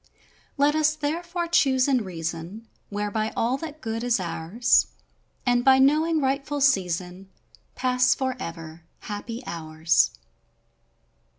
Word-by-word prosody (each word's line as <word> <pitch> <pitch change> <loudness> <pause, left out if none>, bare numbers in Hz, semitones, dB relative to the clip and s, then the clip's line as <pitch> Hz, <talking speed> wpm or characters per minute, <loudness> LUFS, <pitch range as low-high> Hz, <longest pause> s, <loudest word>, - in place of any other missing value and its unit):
Let 285 +1 +3
us, 305 0 +2
therefore, 340 +4 -3
Choose 265 -6 +3
in 260 -5 +2
reason, 175 +4 -6 0.2
Whereby 210 +1 -2
all 240 +3 +1
that 310 +1 -8
good 225 -1 -3
is 245 -3 +1
ours, 175 +6 +1 0.6
And 245 -1 +2
by 265 +1 +6
knowing 310 +4 +3
rightful 275 +2 -1
season 185 -7 0 0.5
Pass 255 0 +2
forever 170 -11 -5
— - - -43
happy 230 +4 -6
hours. 160 0 +1
245 Hz, 115 wpm, -25 LUFS, 185-280 Hz, 0.6 s, by